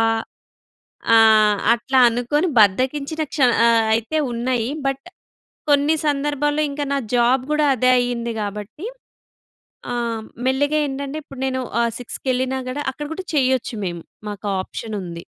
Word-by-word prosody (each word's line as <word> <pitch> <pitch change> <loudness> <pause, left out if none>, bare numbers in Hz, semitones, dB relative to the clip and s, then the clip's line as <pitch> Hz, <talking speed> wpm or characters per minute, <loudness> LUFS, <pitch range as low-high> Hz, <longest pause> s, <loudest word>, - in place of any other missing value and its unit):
ఆ - - +4 1.1
ఆ! - - +8 0.6
అట్లా 260 +3 0
అనుకోని, 245 +8 0
బద్ధకించిన 265 +9 +1
క్ష - - -6 0.3
ఆహ్, 230 -1 +4
అయితే 230 +7 -1 0.2
ఉన్నాయి. 240 0 -1 0.2
బట్, 275 0 -2 0.7
కొన్ని 290 +2 +4
సందర్భాల్లో 295 +1 0
ఇంకా 290 +1 -3
నా - - +1 0.2
జాబ్ 245 +2 +3
కూడా 300 0 +2
అదే 255 +1 +2
అయ్యింది 240 -1 -2
గాబట్టి. 210 - -6 1.1
ఆహ్, 235 -2 -2 0.2
మెల్లిగా 285 +3 +1
ఏంటంటే 280 +2 -5
ఇప్పుడు 275 -3 -12
నేను 260 0 -1 0.2
ఆహ్, 235 - +1
6కి 245 - -7
కెళ్ళినా 260 +1 0
కూడా, 285 +3 -3
అక్కడ 295 +3 -7
కూడా 370 +3 -7
చేయ్యొచ్చు 260 -3 +1
మేము. 175 -2 -5 0.3
మాకా 205 0 -6
ఆప్షనుంది. 185 -5 -6
255 Hz, 135 wpm, -21 LUFS, 230-285 Hz, 1.1 s, ఆ